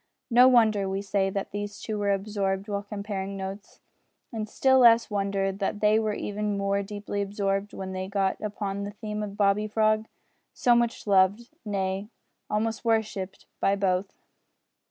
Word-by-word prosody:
No 245 +2 +8
wonder, 220 -6 +4
we 195 +1 -2
say, 195 -1 +1
that 195 0 -4
these 205 0 -5
two 215 -2 -4
were 205 0 0
absorbed 195 0 -1
while 200 -1 -2
comparing 200 -1 -5
notes, 195 +1 -7 0.5
and 215 -2 -4
still 265 +2 +4
less 230 -2 +6
wonder 195 -1 0
that 200 +1 -3
they 215 +1 +4
were 215 -1 -1
even 210 0 -2
more 200 0 0
deeply 205 0 -4
absorbed 200 0 -1
when 190 -1 -6
they 185 0 -4
got 195 -1 -1
upon 200 -1 -3
the 200 - -4
theme 210 0 -5
of 205 -1 -6
Bobby 205 +1 +2
Frog 215 0 +1 0.5
so 245 - +4
much 235 -1 +1
loved, 200 +3 +3
nay, 195 -1 -2 0.4
almost 220 +1 -1
worshipped, 220 -4 -1
by 195 - +2
both. 190 -1 0
205 Hz, 160 wpm, -27 LUFS, 195-215 Hz, 0.5 s, No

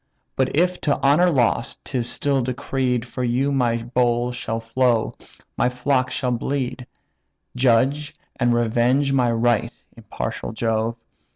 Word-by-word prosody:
But 130 0 0
if, 180 +3 +1
to 145 - +1
honour 155 +6 +5
lost, 120 -5 0
'tis 125 -4 -1
still 140 -2 +1
decreed 125 -1 -1
For 125 +1 -5
you 125 +4 +1
my 125 -4 +1
bowl 120 0 0
shall 115 -2 -3
flow, 115 0 +1 0.5
my 125 - +2
flock 130 +1 0
shall 125 -1 -1
bleed; 125 0 -3 0.7
Judge 130 +4 +2 0.2
and 120 -2 +1
revenge 120 +4 +2
my 125 -3 +2
right, 115 0 +1 0.2
impartial 115 0 -5
Jove! 115 0 -1
125 Hz, 130 wpm, -22 LUFS, 120-135 Hz, 0.7 s, honour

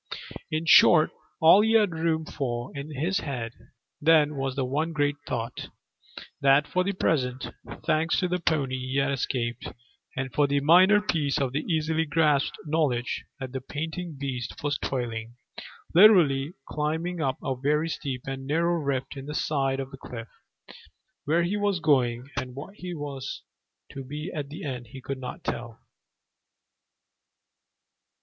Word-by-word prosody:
In 155 +1 -2
short, 160 -1 +7 0.3
all 165 +5 +8
he 220 +1 +2
had 210 -4 +4
room 160 -1 0
for 120 -4 -4
in 140 +2 -6
his 165 +8 0
head 120 - -4 0.5
then 150 -1 +4
was 135 -1 -2
the 135 -2 0
one 155 +6 -1
great 145 -1 +1
thought, 115 +1 -4 0.7
that 140 +2 +5
for 185 - +1
the 200 +2 -1
present, 130 -8 0 0.3
thanks 160 +2 +2
to 180 - +1
the 180 0 -1
pony, 140 -6 0
he 130 +1 -3
had 140 0 +2
escaped, 125 -3 -2 0.5
and 130 -1 -3
for 145 -1 +3
the 140 0 +2
minor 180 +8 +6
piece 150 -9 0
of 135 -1 -1
easily 160 +1 0
grasped 150 -2 +2
knowledge 145 -6 0
that 130 -2 -5
the 130 0 -4
panting 160 +4 -5
beast 125 -9 -5
was 145 -1 0
toiling 115 -3 -3 0.6
literally 170 -7 +6
climbing 160 +3 -2
up 135 -1 0
a 135 -2 -1
very 150 +5 +1
steep 135 -6 -4
and 135 0 -5
narrow 170 +4 +2
rift 140 -2 -2
in 135 0 -8
the 150 - -5
side 135 -3 0
of 135 0 -5
the 135 - -9
cliff; 115 -3 -8 1.0
where 165 +4 +2
he 180 +4 -1
was 205 -3 0
going 125 -5 +2
and 125 -1 -4
what 150 +8 -8 0.2
was 140 -3 -6 0.5
to 135 - -7
be 150 +5 -6 0.2
the 150 - -8
end, 125 -5 -5
he 130 +4 -10
could 135 +1 -5
not 125 -1 -7
tell. 120 -1 -4
145 Hz, 155 wpm, -27 LUFS, 130-160 Hz, 1.0 s, all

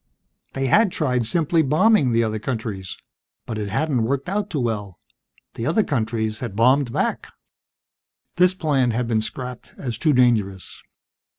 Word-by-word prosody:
They 135 0 -2
had 205 - +4
tried 125 -8 0
simply 165 +3 +2
bombing 155 - +3
the 115 0 +2
other 110 -1 -2
countries, 105 -6 -5 0.5
but 110 -2 -4
it 105 -1 -3
hadn't 130 +4 0
worked 135 +8 -1
out 205 +1 -2
too 155 - -2
well: 105 -6 -3 0.6
the 115 - -4
other 190 +8 +2
countries 110 - -2
had 115 -6 -5
bombed 125 +3 +3
back. - - -1 1.1
This 180 +1 +4
plan 145 -8 +1
had 120 +1 -1
been 110 -2 +1
scrapped 125 +2 -7
as 120 -4 -5
too 155 -3 +2
dangerous. 110 -7 +1
125 Hz, 155 wpm, -22 LUFS, 110-150 Hz, 1.1 s, had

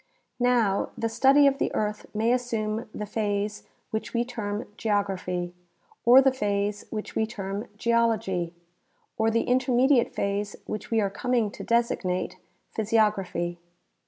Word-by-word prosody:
Now, 240 -5 +2
the 230 - 0
study 270 +5 +5
of 275 0 +3
the - - 0
earth 210 0 -2
may 220 +2 +1
assume 225 -3 -2
the 210 - -5
phase 205 0 -2 0.2
which 220 +2 -3
we 235 +1 +2
term 215 -3 -4
geography, 190 -5 -1 0.5
or 250 +3 +8
the 270 - +5
phase 205 -3 -1
which 215 -1 -5
we 220 - +1
term 200 0 -5
geology, 220 -7 +1 0.7
or 220 0 +3
the 230 +1 +2
intermediate 255 0 +3
phase 200 0 -1
which 215 - -5
we 225 -1 +2
are 200 -1 0
coming 235 -1 0
to - - -8
designate 230 -6 0 0.4
phj' 220 +1 +1
siog 215 -1 +5
raphy. 175 -3 -4
215 Hz, 145 wpm, -26 LUFS, 200-235 Hz, 0.7 s, or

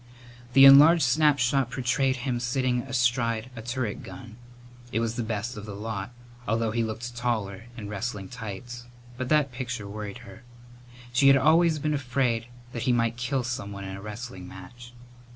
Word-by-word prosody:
The 135 +1 +9
enlarged 150 +4 +8
snapshot 135 -2 +3
portrayed 130 +1 0
him 125 -1 -2
sitting 125 0 0
astride 120 -2 0
a 115 - -7
turret 120 -1 -3
gun. 120 -4 -10 0.6
It 115 - 0
was 115 0 -1
the 120 - -2
best 110 +2 -3
of 105 +1 -8
the 100 - -6
lot, 105 -1 -5 0.4
although 115 0 0
he 115 +1 0
looked 115 +2 -5
taller 115 -4 -2
in 105 -3 -6
wrestling 105 -1 -4
tights, 120 +2 -8 0.3
but 130 0 -4
that 150 -3 +3
picture 125 -4 -5
worried 105 0 -7
her. 100 +4 -12 0.7
She 135 +3 +4
had 135 0 +8
always 160 +3 +4
been 150 +1 -1
afraid 125 -4 0 0.2
that 120 - -5
he - - +5
might 115 -1 +1
kill 125 +2 -1
someone 100 -5 -5
in 95 0 -6
a 95 - -9
wrestling 105 -3 -8
match. 120 +7 -12
120 Hz, 170 wpm, -26 LUFS, 110-130 Hz, 0.7 s, The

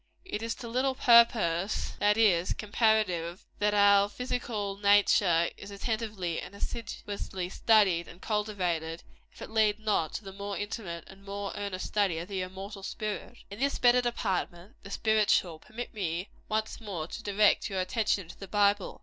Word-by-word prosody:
It 220 - -4
is 230 0 -2
to 240 - -8
little 260 +3 0
purpose, 220 -7 +4
that 210 +1 +3
is, 185 -6 +3
comparatively, 205 -5 +1 0.2
that 210 0 +2
our 200 0 +5
physical 220 -4 -3
nature 200 -4 +4
is 200 - -10
attentively 205 -4 -3
and 200 - -10
assiduously 200 -4 -5
studied 195 -5 +3
and 175 - -13
cultivated, 180 -7 -2 0.3
if - - -11
it - - -9
lead 215 -2 +3
not 210 -8 0
to - - -5
the 195 -1 -9
more 200 0 -5
intimate 205 -6 -5
and 195 0 -15
more 200 0 -5
earnest 200 -3 -4
study 200 -6 +1
of 170 +3 -6
the 195 -2 -2
immortal 195 +2 -7
spirit. 215 +4 -5
In 200 - -8
this 280 +1 +1
better 245 0 +5
department 190 -5 -3
the - - -11
spiritual 205 -6 +2
permit 235 +8 -8
me, 180 -2 -3 0.2
once 220 +1 -2
more, 190 -8 -4
to - - -8
direct 205 +2 +3
your 195 -2 -2
attention 200 -1 0
to - - -12
the 195 - -8
Bible. 205 0 +1
205 Hz, 165 wpm, -29 LUFS, 185-220 Hz, 0.3 s, our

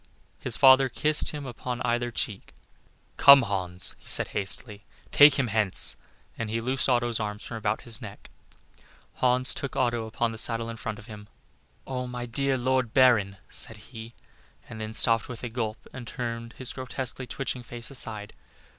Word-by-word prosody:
His - - -2
father 130 0 +7
kissed 150 +5 +2
him 150 -2 -5
upon 125 0 -5
either 120 +1 0
cheek. 110 -3 -4 0.6
"Come, 140 -1 +9
Hans," 95 -3 -3
said - - +1
he, - - -2
hastily, 100 +2 -3 0.3
"take 145 -1 +7
him 135 - +2
hence;" 110 -4 +1 0.4
and 115 -2 -3
he 115 +1 -1
loosed 130 +3 0
Otto's 120 -2 +1
arms 105 -1 -4
from 115 - -6
about 105 0 -1
his 115 +1 -1
neck. 105 -3 -10 0.9
Hans 125 0 +2
took 140 - -4
Otto 120 -3 0
upon 115 +1 -1
the 110 - -8
saddle 115 0 -1
in 115 - -8
front 115 -3 -5
of 105 - -12
him. 105 -3 -11 0.6
"Oh! 125 -1 -4
my 125 0 -5
dear 135 +3 0
Lord 130 -1 0
Baron," 115 -7 +4
said 110 - -4
he, 115 +1 -11 0.5
and 110 - -8
then 110 0 -5
stopped 115 0 +3
with 120 -1 -8
a 120 - -3
gulp, 110 -2 -3 0.2
and 125 -3 -8
turned 115 -2 -5
his 130 -2 -5
grotesquely 130 0 -4
twitching 130 +1 -4
face 120 0 -7
aside. 105 -5 -3
120 Hz, 175 wpm, -27 LUFS, 110-130 Hz, 0.9 s, Come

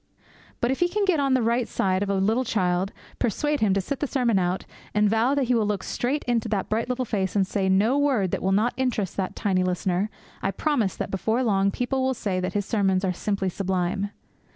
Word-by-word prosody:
But 240 - +2
if 265 - -2
he 350 - +3
can 405 +3 0
get 365 -5 +2
on 275 -2 +2
the 255 - +2
right 235 +1 +1
side 185 0 0
of 205 - -1
a 200 - +1
little 215 +6 +2
child, 185 -4 0 0.3
persuade 295 +6 0
him 210 -3 +3
to 195 - +2
sit 270 +8 -4
the 290 - -1
sermon 240 -7 +2
out, 180 +1 -1 0.3
and 210 0 +4
vow 225 +6 +2
that 280 - +2
he 250 0 +1
will 220 -3 +2
look 205 -2 -1
straight 275 +5 -1
into 235 -2 0
that 200 -3 -1
bright 225 +3 -1
little 250 0 -1
face, 195 -4 -2
and 195 -2 +3
say 190 0 -1
no 205 +7 +3
word 255 -11 +2
that - - -1
will 190 - +1
not 215 +5 +2
interest 240 -8 -1
that 190 -2 -2
tiny 185 -3 +1
listener, 185 +2 0 0.3
I - - 0
promise 235 - 0
him - - -23
that - - -3
before 220 +6 0
long 200 -4 +2
people 250 +5 -1
will 260 0 +1
say 195 -5 -2
that 185 - -2
his 205 -1 -1
sermons 195 -4 +1
are 185 - 0
simply 200 0 -1
sublime. 190 +1 -1
210 Hz, 240 wpm, -25 LUFS, 190-250 Hz, 0.3 s, and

